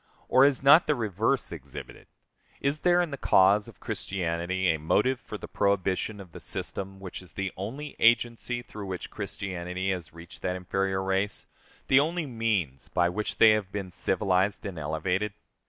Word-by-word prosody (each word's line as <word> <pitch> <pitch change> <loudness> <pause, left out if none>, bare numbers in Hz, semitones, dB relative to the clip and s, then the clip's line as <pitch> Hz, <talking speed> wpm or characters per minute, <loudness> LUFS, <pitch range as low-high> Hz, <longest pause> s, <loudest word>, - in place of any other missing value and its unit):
Or 130 +2 +6
is 140 -2 +2
not 145 +5 +7
the 150 - +3
reverse 115 +3 0
exhibited? 70 -5 -9 0.5
Is 140 +2 0
there, 175 +1 +4
in 170 - -4
the 140 - -4
cause 100 +2 +4
of - - -14
Christianity, 90 0 -1
a 80 - -4
motive 120 +11 +2
for 105 - -7
the - - -8
prohibition 100 +1 0
of 95 -3 -11
the - - -9
system 95 0 -5
which 95 -1 -7
is 90 - -17
the 95 -1 -3
only 135 +10 -6
agency 120 +1 +2
through 105 -4 -8
which 95 -2 -5
Christianity 95 0 -3
has 90 -4 -4
reached 85 +1 -13
that 90 - -1
inferior 95 +1 -1
race, 95 +1 -1 0.4
the 130 - +6
only 165 +3 0
means 110 - -1
by 85 -1 +2
which 105 +4 -3
they 110 - +8
have 105 -3 0
been 100 -3 -4
civilized 95 +2 +1
and 95 -5 -5
elevated? 90 +7 -1
95 Hz, 170 wpm, -28 LUFS, 90-115 Hz, 0.5 s, they